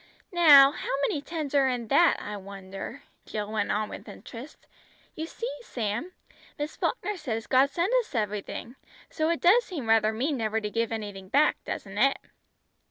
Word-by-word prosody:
"Now, 290 -6 +8
how - - -6 0.2
many 290 - -2
tens 305 -2 -5
are 275 -2 +4
in 245 -3 -3
that, 340 +5 +4
I 210 - -6
wonder," 195 +4 -8 0.2
Jill 210 -1 -4
went 215 -2 -1
on 215 +1 0
with - - -9
interest; 250 +6 -11 0.5
"you 320 +1 -4
see, 470 +8 -5
Sam, 235 - -3 0.5
Miss 295 0 -4
Falkner 420 -4 -2
says 225 -8 -4
God 265 +1 +4
sends 345 - -1
us 475 - -2
everything, 210 +3 -3 0.3
so 315 0 0
it 335 - 0
does 420 +8 +6
seem 310 - -6
rather 220 -1 +4
mean 265 +6 -1
never 220 -1 0
to 210 -1 -4
give 230 +1 -1
anything 205 -4 -6
back, 290 +7 +3
doesn't 195 +1 -5
it?" 275 +3 +4
250 Hz, 170 wpm, -27 LUFS, 215-310 Hz, 0.5 s, Now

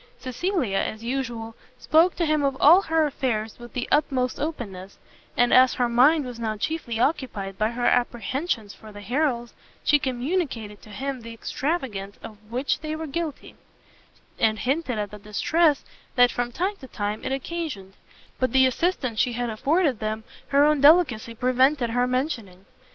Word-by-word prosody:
Cecilia, 255 - -1
as 215 +1 -3
usual, 235 -3 -3 0.2
spoke 325 +8 +3
to 340 - 0
him 305 -1 +2
of 275 -1 0
all 340 +6 +7
her 320 -3 +1
affairs 230 -7 -2
with 240 0 -11
the 250 - -3
utmost 260 -4 +1
openness; 200 - -5 0.4
and 245 0 +4
as 255 0 +6
her 245 - +1
mind 270 +6 +4
was 245 -2 -7
now 220 -2 -2
chiefly 235 -2 -3
occupied 230 - -1
by 215 0 +2
her 240 +1 -3
apprehensions 240 - 0
for 215 -1 -13
the 205 0 -10
Harrels, 240 +1 -1 0.3
she 295 - +4
communicated 255 - -2
to - - -15
him 265 +4 -4
the 230 0 -9
extravagance 230 - -3
of 215 -2 -10
which 255 +4 0
they 310 0 -4
were 320 +1 -5
guilty, 315 0 -5 0.8
and 220 -1 +2
hinted 265 0 -1
at 205 -1 -3
the 210 - -9
distress 290 +9 +1 0.3
that 245 -1 +5
from 245 0 -2
time 375 - -1
to 265 - -11
time 210 -2 -4
it - - -3
occasioned; 270 - -4 0.5
but 255 0 0
the 260 0 +6
assistance 260 -4 0
she 245 - +2
had 240 0 -2
afforded 275 - +1
them 215 0 -3 0.2
her 285 +1 +4
own 300 -2 +3
delicacy 280 -8 +4
prevented 255 +1 +2
her 245 +1 +1
mentioning. 250 - -3
250 Hz, 165 wpm, -25 LUFS, 225-295 Hz, 0.8 s, all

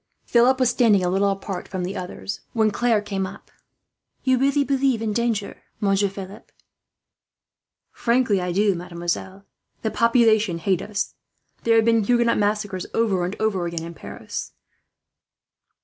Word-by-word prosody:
Philip 250 +2 +4
was 255 -2 +3
standing 225 -6 +3
a - - +1
little 195 +2 +2
apart 195 -1 -4
from 185 -2 -4
the 185 +3 -4
others, 185 +2 -5
when 220 -2 +2
Claire 225 -1 +1
came 195 -2 -2
up 195 - -11
to - - -30
him. - - -36 0.6
"You 260 -1 +3
really 280 +2 +3
believe 270 -3 +1
in 220 -1 -2
danger, 230 -3 -1 0.2
Monsieur 200 0 +2
Philip?" 195 +1 -10 1.4
"Frankly 235 -5 +1
I 180 0 -2
do, 200 +2 +2
mademoiselle. 180 +2 -4 0.4
The 220 - 0
population 220 -5 +3
hate 185 +1 0
us. 210 -2 -3 0.5
There 230 0 +4
have 225 -1 +4
been 230 -1 +3
Huguenot 235 +1 +2
massacres 205 -3 -1
over 205 -6 +1
and 185 +4 -4
over 195 -5 0
again 170 -1 -4
in 170 +1 -7
Paris. - - -7
205 Hz, 155 wpm, -23 LUFS, 190-230 Hz, 1.4 s, Philip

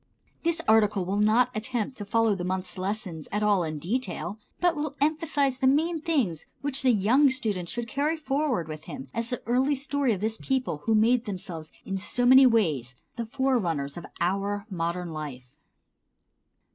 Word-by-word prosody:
This 335 0 0
article 210 -3 +4
will 195 +3 -1
not 230 +4 +4
attempt 240 +2 -2
to 205 - -5
follow 225 +1 +2
the 185 -2 -4
month's 185 0 -3
lessons 185 -5 -4
at 210 +1 0
all 205 -4 +3
in 155 -1 -3
detail, 215 - -3 0.2
but 350 -2 +2
will 295 -1 -3
emphasize 290 -3 +1
the 265 - +3
main 315 +4 +2
things 250 - 0
which 280 -1 -1
the 260 - +3
young 245 +6 +4
student 215 -9 -1
should 240 -1 -3
carry 295 +5 0
forward 275 - -1
with 155 0 -8
him 145 -5 -8
as 230 0 -2
the 245 - -4
early 260 +5 +2
story 280 -1 0
of 200 - -1
this 220 +2 -2
people 255 - -1
who 225 - +3
made 235 +3 +3
themselves 175 -5 -6
in 195 - -2
so 225 +5 -1
many 260 +1 +8
ways 155 - +1 0.2
the 235 -1 -4
forerunners 220 - 0
of 175 - -8
our 200 +3 -1
modern 170 -1 -2
life. 130 -5 -7
220 Hz, 175 wpm, -27 LUFS, 180-265 Hz, 0.2 s, many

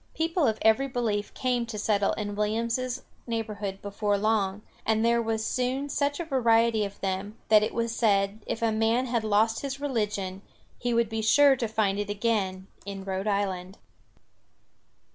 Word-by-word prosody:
People 330 -1 +1
of 220 -1 +1
every 220 +5 +4
belief 225 -5 -1
came 250 -2 0
to 225 -2 -5
settle 205 -1 +1
in 205 -1 -4
Williams's 230 +4 -1 0.2
neighborhood 210 -4 -4
before 205 0 0
long, 210 -1 0 0.2
and 220 0 +1
there 235 0 +3
was 220 -1 -1
soon 260 +3 -1
such 285 +1 0
a 340 - -3
variety 230 -5 +3
of 200 -1 -6
them 195 +3 -3
that 215 -1 +7
it 215 - 0
was 230 0 -2
said 200 -1 +2
if 230 - -3
a 225 - +3
man 225 +3 +2
had 235 -3 -1
lost 220 +1 +2
his 275 -1 -4
religion 210 -8 -2 0.4
he 245 - -1
would 235 -1 +2
be 225 +1 -3
sure 275 +5 +6
to 240 -2 -2
find 210 -2 0
it 205 0 -3
again 200 -3 -1 0.2
in 195 -1 -6
Rhode 190 +1 -3
Island. 195 -2 -1
220 Hz, 170 wpm, -27 LUFS, 205-235 Hz, 0.4 s, that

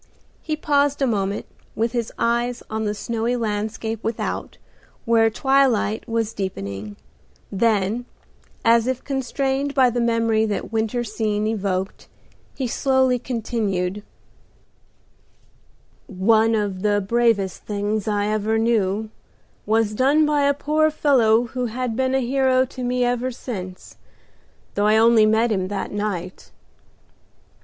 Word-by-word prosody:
He 310 - -2
paused 285 -2 +1
a - - +4
moment, 200 -4 -1 0.3
with 225 +1 0
his 235 -2 -2
eyes 240 +1 0
on 220 0 -2
the 210 0 -1
snowy 230 +3 -2
landscape 220 0 -3
without, 225 0 -3 0.5
where 225 -1 +4
twilight 250 -3 +1
was 225 -1 -1
deepening; 100 - -5 0.6
then, 215 +2 +1 0.6
as 230 +1 +4
if 260 -1 -2
constrained 275 +1 -2
by 255 -3 +4
the 240 0 -1
memory 230 -1 +2
that 210 0 -3
winter 225 +2 0
scene 215 -1 -2
evoked, 195 -3 -2 0.5
he 265 - -3
slowly 260 0 +2
continued, 210 -6 -2 2.1
"One 220 +3 +3
of 200 -3 -2
the 205 0 +2
bravest 205 -2 0
things 210 0 -2
I 205 -1 0
ever 215 +1 0
knew 220 -2 0 0.6
was 220 0 +2
done 280 +7 +3
by 295 -1 +2
a 285 - +3
poor 305 +2 +2
fellow 245 -7 +3
who 245 +1 -3
has 250 +2 -3
been 260 +3 0
a 265 - +2
hero 260 0 +2
to 255 0 -8
me 250 0 +1
ever 245 +1 0
since, 190 -7 -8 0.8
though 205 +1 +1
I 215 +1 +4
only 225 -1 +5
met 220 +2 +2
him 190 -3 0
that 200 0 -4
night. 195 -3 -4
225 Hz, 130 wpm, -22 LUFS, 210-250 Hz, 2.1 s, only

